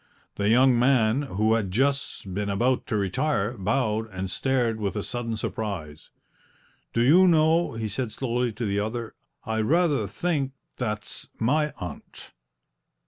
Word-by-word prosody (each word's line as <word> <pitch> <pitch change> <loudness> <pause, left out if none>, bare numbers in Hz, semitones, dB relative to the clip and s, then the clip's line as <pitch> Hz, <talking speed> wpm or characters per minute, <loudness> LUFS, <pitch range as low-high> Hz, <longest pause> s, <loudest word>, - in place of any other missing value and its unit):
The 100 0 0
young 125 +1 +5
man, 125 -1 +3
who 110 -5 +1
had 110 -4 0
just 130 -3 -1
been 100 +1 -2
about 120 +6 +1
to - - -1
retire, 115 - 0
bowed 110 +1 0
and 95 -1 -5
stared 120 -3 0
with 100 -1 -2
a 105 - -2
sudden 115 -2 -3
surprise. 90 -9 -5 0.8
"Do 115 - +1
you 175 +9 +6
know," 165 -1 +3
he 115 -1 -3
said 110 +3 -3
slowly 120 0 -1
to 115 +2 -4
the 100 0 0
other, 110 +2 -3 0.3
"I 110 0 -1
rather 145 - +2
think 140 - -1 0.3
that's 105 -4 -3
my 150 +6 +2
aunt!" 90 - -9
115 Hz, 145 wpm, -26 LUFS, 105-135 Hz, 0.8 s, you